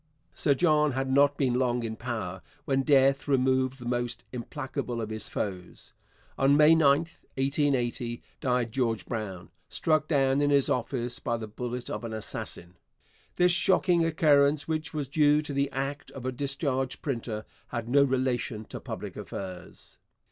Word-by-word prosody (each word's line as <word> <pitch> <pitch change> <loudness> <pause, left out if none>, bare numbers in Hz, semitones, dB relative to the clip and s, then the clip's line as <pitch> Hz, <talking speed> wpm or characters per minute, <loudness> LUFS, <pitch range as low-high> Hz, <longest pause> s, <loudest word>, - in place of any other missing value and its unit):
Sir 140 - +2
John 150 -2 +3
had 135 +1 -1
not 140 +1 +4
been 130 -4 +1
long 125 -2 +1
in 110 -1 -3
power 110 -7 -4 0.2
when 135 -1 +1
death 135 0 +3
removed 130 -1 +2
the 120 - -10
most 120 0 -2
implacable 130 0 -4
of 110 -1 -4
his 110 0 -3
foes. 90 -3 -5 0.5
On 140 +1 +5
May 155 +1 +7
9, 145 -2 +5 0.3
1880, 135 -4 0 0.2
died 125 -4 0
George 115 -3 -1
Brown, 95 -7 -5 0.2
struck 155 -1 +1
down 135 -2 +2
in 145 - +3
his 140 -2 +3
office 120 0 -2
by 120 - -1
the 115 - -5
bullet 120 +3 -5
of - - -4
an 115 -1 -5
assassin. 90 -4 -5 0.6
This 180 0 +4
shocking 180 -1 +3
occurrence, 150 -3 +3
which 155 -1 -2
was 150 -3 -3
due 150 +1 +4
to 150 - -5
the 140 0 +1
act 135 +1 -4
of 130 -2 -9
a 130 - 0
discharged 135 0 -2
printer, 115 -6 -3 0.2
had 115 -1 -4
no 140 +4 +4
relation 125 -4 0
to - - -8
public - - -7
affairs. 90 -2 -8
130 Hz, 160 wpm, -28 LUFS, 120-145 Hz, 0.6 s, May